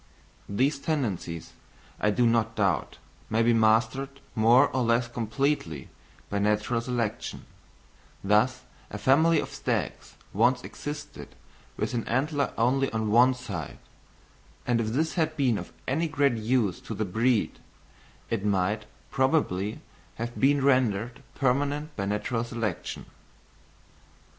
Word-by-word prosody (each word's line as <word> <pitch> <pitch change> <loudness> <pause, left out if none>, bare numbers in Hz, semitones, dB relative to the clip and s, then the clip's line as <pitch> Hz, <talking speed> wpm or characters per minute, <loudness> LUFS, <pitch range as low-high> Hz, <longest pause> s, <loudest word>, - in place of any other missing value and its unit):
These 135 +8 +1
tendencies, 105 - -3 0.5
I 105 - +2
do 120 +4 +2
not 115 -1 +2
doubt, 95 -4 0 0.3
may 110 +1 +2
be 120 +1 +4
mastered 115 +5 +2
more 115 +3 +5
or 130 - +2
less 115 0 +2
completely 115 - -2 0.4
by 100 - -2
natural 105 +3 +1
selection: 115 -3 -3 0.8
thus 105 +6 +2 0.3
a - - -6
family 160 +4 +4
of 140 - -4
stags 120 - -3 0.2
once 125 +4 +3
existed 150 0 -8 0.4
with - - -2
an 115 -2 -2
antler 140 +4 0
only 130 +4 +2
on 110 -1 -1
one 125 +3 +6
side; 100 - -6 0.9
and 120 -1 +2
if 110 - -2
this 150 +9 0
had 160 -2 0
been 125 -7 +2
of - - -9 0.2
any 160 +6 +1
great 145 -4 +2
use 110 -3 0
to 110 - -6
the 110 - -1
breed, 115 +4 +1 0.7
it 115 -4 -1
might 105 +1 0 0.3
probably 130 - +1 0.3
have 120 +1 -5
been 140 +1 +3
rendered 125 -2 +1
permanent 145 +3 0
by 100 - -2
natural 115 +3 -1
selection. 115 -6 -4
120 Hz, 130 wpm, -27 LUFS, 110-135 Hz, 0.9 s, one